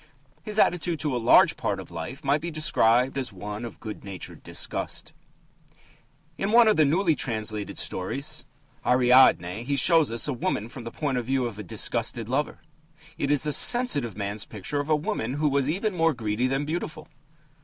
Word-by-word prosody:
His 215 -1 -1
attitude 175 -4 +1
to 150 -4 -1
a 120 - -2
large 115 - +5
part - - -2
of - - -10
life 105 - -7
might 145 +2 +1
be 170 - -4
described 130 -5 +2
as 130 -4 -3
one 105 +3 -7
of 120 - -8
good 110 -2 -8
natured 95 -3 -8
disgust. - - -3 1.3
In 195 +2 -1
one 235 0 +6
of 215 - +4
the 155 - +4
newly 165 +4 +2
translated 110 -6 -4
stories, 140 +11 -3 0.4
Ariadne, 125 -6 +4
he 140 +3 -1
shows 160 0 +4
us 115 +3 -1
a 145 - -1
woman 115 -2 -3
from 120 -1 -10
the 115 - -6
point 135 -3 -2
of 120 - -7
view 130 -1 0
of 110 -3 -6
a - - -5
disgusted 110 +4 0
lover. 135 +5 -2 0.6
It 140 - -1
is 145 +1 +3
a 150 - +1
sensitive 240 - +4
man's 100 0 -4
picture 110 +8 -5
of 145 +2 -4
a 155 - +4
woman 130 -5 -3
who 150 +1 0
was 140 0 +1
even 200 +6 -1
more 165 -3 +1
greedy 110 +1 -1
than 135 +2 -1
beautiful. 155 0 -5
135 Hz, 185 wpm, -25 LUFS, 115-155 Hz, 1.3 s, one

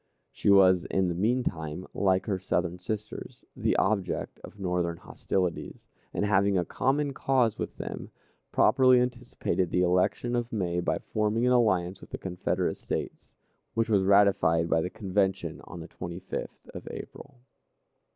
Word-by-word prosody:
She - - -1
was 95 -2 +6
in 95 -2 +1
the - - -1
mean 115 +8 +1
time, 80 -2 -4
like 95 -1 +2
her 95 -3 -1
Southern 90 -1 -1
sisters, 105 +3 -6
the - - 0
object 95 -3 -1
of 105 - -12
Northern 90 -3 -1
hostilities, 90 0 -3 0.3
and, - - -1
having 100 -1 +3
a 90 - +1
common 140 - 0
cause 125 -5 +1
with - - -4
them, - - -6 0.4
properly 130 -1 +5
anticipated 125 -7 -1
the 90 - +2
election 90 +7 +1
of 120 0 -2
May 90 -5 -1
by 90 - 0
forming 110 +2 -1
an 125 - +4
alliance 95 -6 +2
with - - -13
the - - -5
Confederate 90 -1 -2
States, - - -5 0.4
which 115 0 +1
was 100 -2 +4
ratified 95 -4 +4
by 80 - +3
the 90 - -2
Convention 95 0 -1
on 85 0 -9
the 80 - -8
25th 90 +2 -7
of - - -9
April. 140 -1 -9
95 Hz, 155 wpm, -28 LUFS, 90-110 Hz, 0.4 s, was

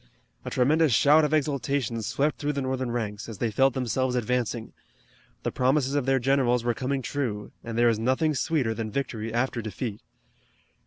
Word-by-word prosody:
A - - -5
tremendous 150 +4 +3
shout 150 +7 +5
of 150 - +1
exultation 140 -5 0
swept 140 +8 -1
through 150 0 -1
the 140 - -2
Northern 130 -1 -2
ranks, 110 -2 -3
as 110 - -7
they 115 +1 -1
felt 135 +4 +3
themselves 130 0 0
advancing. 120 -1 -1 0.7
The - - -1
promises 135 +1 +1
of 145 -3 0
their 135 0 +4
generals 125 -2 +2
were 120 0 +1
coming 130 +2 -2
true, 115 -9 -3
and 115 -1 -5
there 120 0 +5
is 115 -2 +2
nothing 130 +7 +1
sweeter 135 -5 0
than 110 -1 -4
victory 115 -3 -3
after 120 +1 -1
defeat. 110 0 -5
125 Hz, 175 wpm, -26 LUFS, 115-140 Hz, 0.7 s, shout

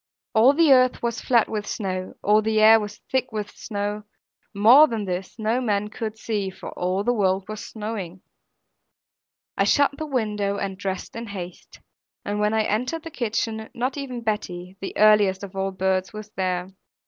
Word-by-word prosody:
All 235 +5 +6
the 310 -2 +5
earth 255 -1 +3
was 235 -1 -2
flat 235 -3 +3
with 210 -1 -4
snow, 185 -3 -4
all 210 +1 +4
the 220 0 +1
air 220 +1 +8
was 210 -1 -6
thick 260 -1 0
with 210 -2 -4
snow; 205 -1 -4 0.5
more 235 +9 +7
than 225 -6 -3
this 185 +2 -4
no 225 +3 0
man 210 -3 0
could 220 0 -5
see, 210 -4 -2
for 190 - -9
all 185 +2 -1
the 245 - +2
world 190 -3 +1
was 215 0 -6
snowing. 210 -5 -6 1.3
I - - +2
shut 285 -1 +4
the 310 - -3
window 210 -6 -1
and 195 -1 -3
dressed 190 0 -5
in 230 0 -6
haste; 180 -3 -9 0.4
and 205 0 -2
when 210 +1 +1
I 220 - +3
entered 250 +11 -2
the 330 - -8
kitchen, 220 -3 -2
not 255 +2 -1
even 265 -4 -5
Betty, 185 -4 -3
the 195 - -5
earliest 205 -2 +4
of 195 -1 -8
all 195 0 -1
early 190 -1 -7
birds, 190 0 0
was 215 0 -8
there. 185 -2 -2
210 Hz, 185 wpm, -24 LUFS, 195-230 Hz, 1.3 s, air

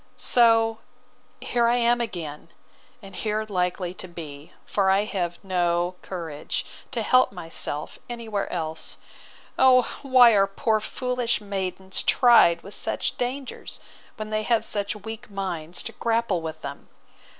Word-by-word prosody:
So 225 -2 +4 0.6
here 240 -1 +1
I 240 - +3
am 240 0 +3
again, 165 -9 -5 0.5
and 195 -1 -11
here 215 +3 -1
likely 180 -2 -1
to 185 - -7
be; 155 -4 -9
for 195 -2 +1
I 195 +2 +4
have 175 -5 -3
no 175 -1 +1
courage 165 -6 -4 0.2
to 235 -4 -2
help 255 +4 +4
myself 165 -4 -4
any 235 -1 -6
where 205 -2 -2
else. 160 -2 -2 0.6
O 255 -1 +7 0.2
why 255 -3 +7
are 195 -2 +4
poor 215 +2 +1
foolish 250 +1 -1
maidens 190 -2 -3
tried 235 -9 +5
with 200 - -9
such - - 0
dangers, 255 +1 -4 0.4
when 215 -1 -6
they 215 0 0
have 230 +1 +1
such 205 0 -1
weak 220 +3 -8
minds 180 -4 -4
to - - -5
grapple 230 -6 0
with 160 -1 -6
them! 140 0 -8
200 Hz, 140 wpm, -25 LUFS, 175-235 Hz, 0.6 s, O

